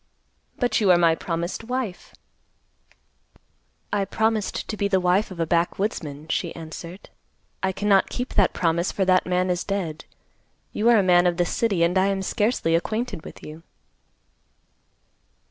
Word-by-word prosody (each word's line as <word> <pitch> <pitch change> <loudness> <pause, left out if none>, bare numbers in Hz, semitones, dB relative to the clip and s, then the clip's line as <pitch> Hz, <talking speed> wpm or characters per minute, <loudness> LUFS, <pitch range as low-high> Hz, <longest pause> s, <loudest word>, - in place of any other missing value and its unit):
"But 245 -2 +1
you 200 - +3
are 180 - +7
my 170 -1 +4
promised 170 +4 -4
wife." 245 -5 -5 1.8
"I 205 -1 +2
promised 220 +2 -1
to 215 - -3
be 200 -1 0
the 190 -2 +2
wife 180 +3 +2
of 185 -3 -10
a 165 - +1
backwoodsman," 170 -3 -1
she 170 +1 -2
answered. 170 +3 -9 0.5
"I 190 - +1
cannot 200 0 +2
keep 250 +1 -4
that 200 -3 +3
promise, 170 +1 0
for 195 - 0
that 185 -1 +3
man 180 0 +1
is 175 0 -1
dead. 185 -6 -4 0.7
You 220 +3 +2
are 235 - +6
a 200 - +4
man 180 -1 +5
of 175 -1 0
the 175 - +2
city, 195 -2 0
and 180 +3 +2
I 190 - +3
am 195 -1 -1
scarcely 210 -5 0
acquainted 175 +3 -1
with - - -12
you." 155 +2 -9
185 Hz, 160 wpm, -24 LUFS, 170-205 Hz, 1.8 s, are